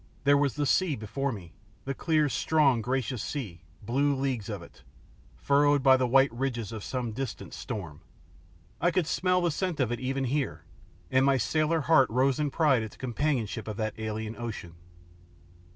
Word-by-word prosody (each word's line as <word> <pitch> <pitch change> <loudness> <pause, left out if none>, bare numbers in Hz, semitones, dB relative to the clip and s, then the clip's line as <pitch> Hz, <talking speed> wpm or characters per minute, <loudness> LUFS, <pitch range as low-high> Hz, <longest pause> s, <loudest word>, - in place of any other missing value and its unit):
There 145 0 +5
was 140 -2 +1
the 145 -1 0
sea 165 +2 +2
before 135 +6 -3
me, 90 -8 -9 0.3
the 135 - -2
clear, 155 +1 +1
strong, 140 -1 +2
gracious 125 -1 -2
sea, 105 - -5 0.2
blue 140 +6 +1
leagues 130 -6 -2
of 100 -5 -5
it, 85 - -16 0.6
furrowed 145 0 +3
by 135 -1 +7
the 130 -1 +1
white 135 +1 +4
ridges 120 -4 -3
of 110 -3 -6
some 125 -3 -3
distant 120 0 -6
storm. 95 - -6 0.8
I 175 - +4
could 180 -1 +1
smell 180 +3 +1
the 175 -1 +1
scent 180 0 -2
of 125 -4 +1
it 120 - -2
even 135 +1 -2
here, 135 +2 -2 0.5
and 130 0 +4
my 135 0 +4
sailor 155 +7 +1
heart 140 -4 +4
rose 130 +3 +2
in 150 -1 +1
pride 140 -5 +3
at 110 - -4
the - - -17
companionship 120 -4 -2
of 105 -1 -5
that 110 -1 -2
alien 110 0 -4
ocean. 110 -8 -6
130 Hz, 180 wpm, -28 LUFS, 110-145 Hz, 0.8 s, by